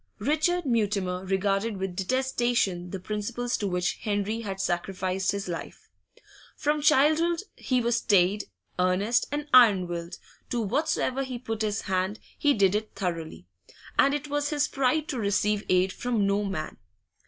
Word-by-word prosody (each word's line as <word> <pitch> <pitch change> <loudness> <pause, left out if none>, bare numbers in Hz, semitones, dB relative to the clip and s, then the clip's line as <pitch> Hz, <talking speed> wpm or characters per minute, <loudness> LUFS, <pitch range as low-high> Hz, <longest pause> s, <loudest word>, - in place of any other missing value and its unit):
Richard 310 - +1
Mutimer 200 -7 0
regarded 195 +3 0
with 190 -1 -4
detestation 240 -4 0
the 195 - -5
principles 220 +5 -3
to 205 - -2
which 180 -1 -1
Henry 210 +1 -2
had 195 -3 -5
sacrificed 185 +1 -1
his 200 -1 -4
life. 170 -2 -7 0.6
From 295 +1 0
childhood 310 +4 +3
he 255 -1 0
was 235 0 +1
staid, 200 -2 +2 0.3
earnest, 190 +6 +2
and 295 0 -3
iron 215 -8 +7
willed; 170 0 -5 0.3
to 240 - -1
whatsoever 260 +3 0
he 260 -2 -4
put 225 -2 -5
his 215 0 -1
hand, 190 +2 -1 0.2
he 290 -1 +2
did 195 -3 +3
it 215 +1 -3
thoroughly, 170 -5 -4 0.5
and 280 +1 +5
it 295 0 -4
was 290 0 -1
his 300 -1 +1
pride 275 +3 +1
to 260 - -2
receive 210 0 +1
aid 185 +1 +3
from 235 -5 0
no 200 +1 +1
man. 155 -6 -4
210 Hz, 155 wpm, -27 LUFS, 190-255 Hz, 0.6 s, iron